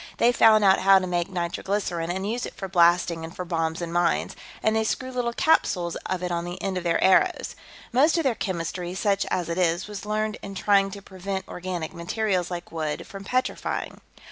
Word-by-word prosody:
They 240 - +4
found 220 -3 +5
out 195 -1 +5
how 195 +1 +6
to 190 - 0
make 175 -1 -1
nitroglycerine, 175 -1 -2
and 190 +3 -2
use 240 +3 -2
it - - -11
for 195 - -5
blasting 170 -2 +3
and 165 +2 -8
for 180 - -5
bombs 165 -1 -2
and 170 0 -5
mines, 175 -1 +1 0.3
and 220 0 +2
they 220 - +2
screw 255 +4 -2
little 245 -2 -1
capsules 180 - +2
of 185 -1 -2
it 180 - -2
on 170 0 -1
the 175 +1 -6
ends 190 -2 -2
of - - -9
their 170 -1 +1
arrows. 190 0 +3 0.4
Most 300 +7 +4
of 330 - +1
their 265 -4 +2
chemistry, 180 -3 -4
such 200 0 +1
as 180 -3 -1
it 170 +2 -2
is, 175 -1 +1
was 205 -2 -7
learned 215 +1 -2
in 195 0 -8
trying 195 0 +3
to 200 0 -9
prevent 190 0 -5
organic 180 -2 -5
materials, 180 +1 -1
like 175 -1 -6
wood, 155 -2 -3
from 195 0 -9
petrifying. 255 +6 -2
185 Hz, 210 wpm, -25 LUFS, 175-205 Hz, 0.4 s, how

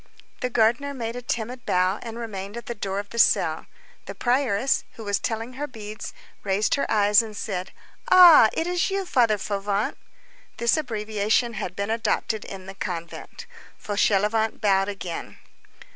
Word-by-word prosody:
The 250 - -1
gardener 240 +5 +1
made 230 -2 -4
a 245 - -5
timid 245 +1 -4
bow, 185 +3 +1
and 230 -1 -7
remained 205 -2 -6
at 235 - -7
the 235 - -4
door 195 -3 -4
of 200 0 -5
the 235 - -4
cell. - - +3 0.4
The - - -7
prioress, 250 -1 +1
who 225 - -10
was 205 -1 0
telling 225 +2 -3
her 290 +3 -4
beads, 215 -4 -8 0.3
raised 200 +1 +1
her 280 - 0
eyes 210 -1 +5
and 215 -2 -8
said:— 190 -4 -4 0.4
"Ah! 345 -11 +9
it 325 - -1
is 355 +1 0
you, 390 0 -2
Father 235 -9 +3
Fauvent." 200 0 -2 0.6
This 235 -1 +2
abbreviation 220 -3 0
had 180 -4 -5
been 200 +2 -2
adopted 225 -1 -1
in 190 -1 -9
the 195 - -8
convent. 180 - -6 0.3
Fauchelevent 210 +2 +1
bowed 195 -1 +2
again. 185 -4 -6
220 Hz, 160 wpm, -24 LUFS, 200-240 Hz, 0.6 s, Ah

